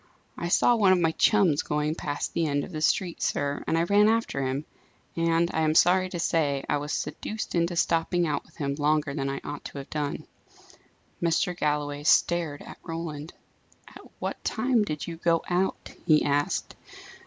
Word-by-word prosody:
I 170 - -4
saw 240 +7 +4
one 205 -4 +4
of 185 - +4
my 165 -2 +2
chums 180 -4 +3
going 150 +1 -1
past 145 -3 -4
the 165 -1 0
end 145 -1 0
of - - -8
the 155 -3 -5
street, 175 +2 0
sir, 145 0 -1
and 165 - +1
I 165 - +2
ran 205 +4 +4
after 225 -11 0
him. 135 +3 -2 0.5
And 165 +1 +1
I - - 0
am 155 0 +2
sorry 185 +2 +4
to 180 - -5
say 145 -5 0
I - - +1
was 145 +1 -5
seduced 210 +8 -4
into 170 0 +1
stopping 170 +1 +1
out 150 -3 -1
with 160 - -24
him 140 -3 -2
longer 150 0 +1
than 135 -1 -2
I 135 0 -4
ought 145 0 -6
to - - -8
have 140 0 -8
done." 145 -2 -3 1.0
Mr. 175 +2 +1
Galloway 145 -2 -1
stared 160 -1 +2
at - - -11
Roland. 165 -2 -6 0.5
"At - - -13 0.2
what - - -5
time 240 -1 +1
did 150 -7 -4
you 165 -1 -6
go 165 0 +1
out?" 180 +2 -1 0.2
he 155 -3 +5
asked. 145 +5 0
160 Hz, 190 wpm, -27 LUFS, 145-175 Hz, 1.0 s, he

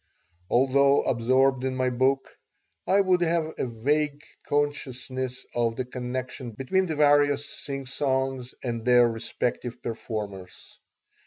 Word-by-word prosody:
Although 140 +2 +4
absorbed 130 +2 +2
in 130 0 -1
my 130 0 +1
book, 130 +2 0 0.5
I 195 +1 +5
would 185 -2 +2
have 165 -2 +1
a - - 0
vague 145 +5 -1 0.2
consciousness 130 -3 -2
of 115 -1 0
the 130 - -3
connection 125 -1 -5
between 185 - 0
the 160 - -2
various 145 -1 +4
singsongs 135 -2 -3
and 115 -3 -3
their 120 0 +6
respective 115 +1 -3
performers. 105 -5 -6
130 Hz, 115 wpm, -26 LUFS, 120-145 Hz, 0.5 s, their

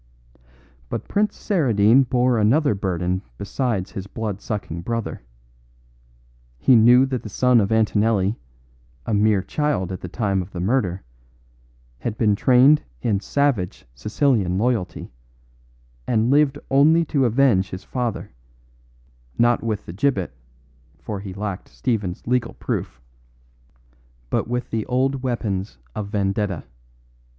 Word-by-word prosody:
"But - - -4
Prince 210 +1 0
Saradine 125 - +3
bore 125 -2 +2
another 125 +5 +3
burden 90 -1 -2 0.2
besides 105 -2 -2
his 95 0 -6
blood 105 -1 -5
sucking 100 -7 -4
brother. 115 +4 -4 1.4
He 125 - +4
knew 120 +3 +6
that 130 -2 -3
the 110 - -8
son 125 +3 +3
of 100 - -1
Antonelli, 110 -1 +2 0.7
a 110 - -2
mere 105 -2 +3
child 140 - -1
at 95 - -6
the - - -6
time 95 0 -1
of 90 +2 -10
the 90 - -5
murder, 95 -2 0 1.0
had 105 - -4
been 105 -3 +3
trained 130 +7 +5 0.2
in 105 -4 +1
savage 120 -4 -1
Sicilian 100 - 0
loyalty, 110 - -1 1.0
and 115 +1 +2
lived 145 -1 +3
only 155 +5 +5
to 140 -3 +1
avenge 120 -6 +3
his 95 +1 -7
father, 120 - -3 1.1
not 120 0 +3
with 110 -3 -2
the 85 - -8
gibbet 100 - 0 0.6
(for 105 -2 -6
he 100 -1 -7
lacked 100 0 -5
Stephen's 105 -6 -3
legal 125 +1 0
proof), - - -4 1.3
but - - 0
with 125 +1 -3
the 110 -1 -1
old 130 +1 0
weapons 105 - -3 0.2
of 105 - -4
vendetta. 100 -3 -1
110 Hz, 125 wpm, -22 LUFS, 95-125 Hz, 1.4 s, knew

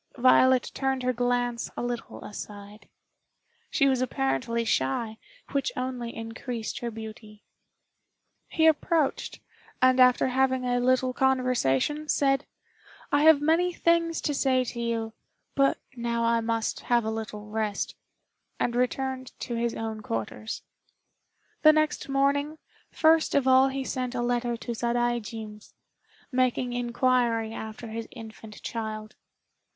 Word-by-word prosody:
Violet 255 0 +5
turned 265 -1 -1
her 255 0 +1
glance 245 0 0
a - - -2
little 240 -1 -5
aside. 205 0 -9 0.8
She 275 - +3
was 260 -2 +2
apparently 230 - -1
shy, 215 - 0 0.3
which 275 -2 0
only 250 -2 -4
increased 225 0 -5
her 240 - -3
beauty. 215 -1 -10 1.0
He 320 - +1
approached, 320 -1 +1 0.4
and 255 0 +4
after 250 +1 +5
having 260 0 +1
a 245 0 +1
little 255 +1 +2
conversation, 260 - +1
said, 275 0 +2 0.6
"I 290 - +3
have 315 -3 +7
many 330 +4 +3
things 335 -1 +1
to 295 - -1
say 260 -2 +2
to 240 -1 -6
you, 230 -1 -2 0.4
but 275 0 +3 0.2
now 235 -1 -1
I 230 0 +2
must 230 0 -1
have 240 -2 +1
a 220 - -1
little 215 -1 -5
rest," 215 -2 -2 0.7
and 240 - 0
returned 260 +1 -1
to 240 - -4
his 235 0 -1
own 220 -1 -4
quarters. 110 - -4 1.0
The 310 0 +8
next 310 -2 0
morning, 285 +3 +1 0.3
first 320 0 +3
of 275 -2 +3
all 260 +1 +6
he 270 0 -3
sent 255 -1 -3
a 240 - -1
letter 240 -1 0
to 235 +1 -5
Sadaijin's, 235 -2 -3 0.6
making 255 -1 +1
inquiry 240 -2 +1
after 220 +1 -7
his 225 +1 -5
infant 220 -2 -11
child. 215 -2 -5
245 Hz, 130 wpm, -27 LUFS, 225-265 Hz, 1.0 s, The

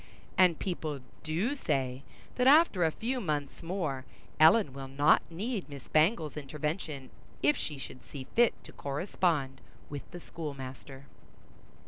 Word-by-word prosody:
And 180 -4 +5
people 155 -7 -3 0.2
do 170 - 0
say, 135 - -1 0.3
that 250 0 +2
after 285 - +6
a 160 - +4
few 250 +8 -2
months 150 -6 -2
more, 165 -7 -2 0.4
Ellen 160 - +6
will 135 0 -6
not 145 +3 +4
need 200 +2 -3
Miss 140 -2 -9
Bangle's 155 -1 +2
intervention 150 -1 -4 0.3
if 145 +2 +5
she 150 - -4
should 130 -1 -9
see 140 -3 -8
fit 235 -1 +5
to - - -11
correspond 140 -2 -1 0.3
with 145 -2 -6
the 175 - -8
schoolmaster. 135 -4 -7
155 Hz, 135 wpm, -31 LUFS, 140-185 Hz, 0.4 s, after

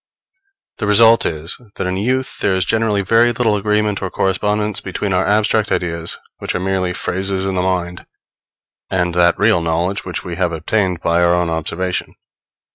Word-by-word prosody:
The 105 - -1
result 115 +2 +5
is, 80 +8 -4
that - - -3
in 90 0 -1
youth 130 +6 -1
there 95 - +1
is 95 -1 0
generally 110 0 +1
very 115 +4 +4
little 115 -2 +1
agreement 105 0 0
or 95 - -2
correspondence 105 +3 -1
between 95 +1 -3
our 90 +1 +1
abstract 105 +1 +2
ideas, 85 -1 -2 0.2
which - - -3
are - - 0
merely 95 -1 -1
phrases 95 +2 -2
in 95 - -1
the 90 - 0
mind, 90 -1 -2 0.8
and 90 -2 0
that 85 -1 +3
real 105 -4 +3
knowledge 85 +5 -1
which 90 - -5
we 85 -2 -5
have 90 -2 0
obtained 90 +2 -1
by 85 +1 +2
our 85 0 +4
own 90 -1 0
observation. 85 +3 -3
95 Hz, 175 wpm, -18 LUFS, 90-105 Hz, 0.8 s, result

